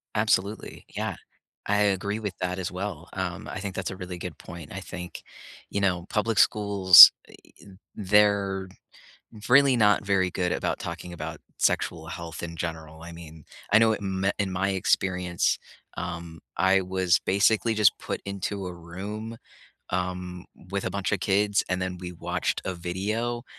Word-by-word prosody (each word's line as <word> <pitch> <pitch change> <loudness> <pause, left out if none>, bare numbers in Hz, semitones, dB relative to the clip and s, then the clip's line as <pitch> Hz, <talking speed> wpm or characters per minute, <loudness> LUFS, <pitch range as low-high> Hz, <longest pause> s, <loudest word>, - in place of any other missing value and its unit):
Absolutely. 105 -1 -1
Yeah. - - -2 0.5
I 105 0 +2
agree 100 +1 0
with 105 -4 -4
that 90 0 -2
as 95 - -3
well. 90 -3 -6
Um, 95 -2 -4
I - - -5
think 95 -1 -5
that's 95 -2 -3
a 95 - -7
really 90 -1 -7
good - - -7
point. 85 -4 -10
I 95 - -5
think, 90 -2 -8 0.5
you 100 - -2
know, 90 -3 0
public 110 0 0
schools, 100 -5 +9 0.2
e - - -16 0.3
e - - -16 0.3
they're 100 -1 +2 0.8
really 135 0 +6
not 105 -3 +3
very 95 -2 +1
good 90 0 -1
about - - -2
talking 90 - -7
about 80 -1 -6 0.2
sexual 80 -1 0
health 85 -1 -7
in 85 -1 -6
general, 80 -1 -6
I 85 +1 -9
mean, 80 -2 -12 0.3
I - - +7
know 110 0 +4
in 95 -3 -3
me 95 - +3
in 100 -2 -1
my 95 +1 0
experience, 90 -2 0 0.4
um, 85 -1 -6 0.2
I 95 +1 +4
was 95 0 +1
basically 110 +3 +2
just 105 -4 +4
put - - -5
into 100 0 -4
a 90 - -5
room, 100 +7 -7 0.6
um, 90 0 -3 0.3
with 100 0 -2
a - - -2
bunch 100 -1 -2
of 100 - -2
kids, 100 +1 +2
and 90 0 -1
then 90 0 -3
we 90 0 -7
watched 85 - -2
a 95 - -2
video 105 +7 -3
95 Hz, 170 wpm, -26 LUFS, 90-100 Hz, 0.8 s, schools